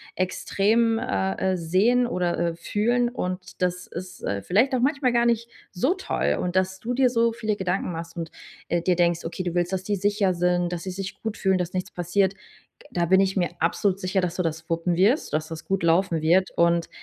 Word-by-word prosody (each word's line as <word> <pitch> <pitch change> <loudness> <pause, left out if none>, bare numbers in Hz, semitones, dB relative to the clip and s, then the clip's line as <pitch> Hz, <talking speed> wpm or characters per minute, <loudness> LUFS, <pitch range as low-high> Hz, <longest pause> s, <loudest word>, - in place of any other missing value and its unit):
extrem, 220 +5 +1
äh, 95 - -1
äh, - - -1
sehen 200 +9 +2
oder, 180 -7 -1
äh, 170 -1 0
fühlen 240 +7 0
und 185 -6 -5
das 180 0 -1
ist, 180 +2 -8
äh, 100 0 -2
vielleicht 225 - +2
auch 255 - +2
manchmal 270 0 +2
gar 235 0 +3
nicht 235 0 0 0.2
so 255 - +1
toll. 375 - -1
Und 180 0 -3
dass 185 0 +1
du 240 +4 -3
dir 255 -1 +4
so 230 -1 +2
viele 215 -2 -2
Gedanken 185 -1 -1
machst 165 0 -7
und, 165 -2 -5 0.4
äh, 175 0 +1
dir 180 +1 +2
denkst, 170 -1 +1
okay, 175 +2 -4
du 175 -2 -3
willst, 175 +1 0
dass 190 0 -1
sie 205 - 0
sicher 205 -1 +1
sind, 175 0 +1
dass 170 -1 -4
sie 190 - -4
sich 195 +1 -6
gut 220 -1 -3
fühlen, 190 -1 +2
dass 180 0 -3
nichts 185 0 -3
passiert. 185 +2 +1 0.6
Da 175 - 0
bin 190 +3 +5
ich 195 0 +1
mir 175 -4 +1
absolut 185 +3 +1
sicher, 190 +1 0
dass 180 -1 -2
du 180 - -1
das 160 -1 -4
wuppen 170 +1 0
wirst, 215 - +2
dass 155 0 0
das 160 -1 -8
gut 190 -3 -1
laufen 170 0 +2
wird. 175 +4 +3
Und 170 0 +3
185 Hz, 220 wpm, -25 LUFS, 170-205 Hz, 0.6 s, bin